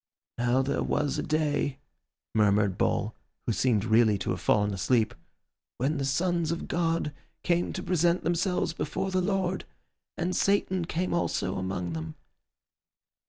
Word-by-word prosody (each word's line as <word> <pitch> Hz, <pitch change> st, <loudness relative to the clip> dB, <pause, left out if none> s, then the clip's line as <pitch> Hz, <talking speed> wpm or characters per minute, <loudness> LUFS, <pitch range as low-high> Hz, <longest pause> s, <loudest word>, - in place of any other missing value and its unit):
"'Now 125 Hz, +2 st, +3 dB
there 135 Hz, -, -1 dB
was 145 Hz, -2 st, 0 dB
a -, -, +1 dB
day,'" 150 Hz, -3 st, 0 dB, 0.6 s
murmured 105 Hz, -2 st, +3 dB
Bull, 105 Hz, +2 st, 0 dB, 0.3 s
who 115 Hz, -, +1 dB
seemed 105 Hz, +1 st, +2 dB
really 110 Hz, -2 st, +4 dB
to -, -, -2 dB
have -, -, -3 dB
fallen 105 Hz, 0 st, +2 dB
asleep, 110 Hz, +4 st, +1 dB, 0.6 s
"'when 140 Hz, +4 st, 0 dB
the 135 Hz, -, 0 dB
sons 170 Hz, +3 st, +1 dB
of 170 Hz, -, -3 dB
God 165 Hz, -3 st, 0 dB, 0.3 s
came 175 Hz, 0 st, +1 dB
to 185 Hz, -, -4 dB
present 175 Hz, 0 st, +2 dB
themselves 175 Hz, -1 st, 0 dB
before 190 Hz, +3 st, -2 dB
the 185 Hz, 0 st, +2 dB
Lord, 190 Hz, -1 st, 0 dB, 0.5 s
and 180 Hz, +1 st, -1 dB
Satan 190 Hz, -3 st, +2 dB
came 175 Hz, +2 st, -1 dB
also 170 Hz, -, 0 dB
among 90 Hz, -2 st, -3 dB
them. 80 Hz, -1 st, -5 dB
150 Hz, 145 wpm, -28 LUFS, 110-175 Hz, 0.6 s, really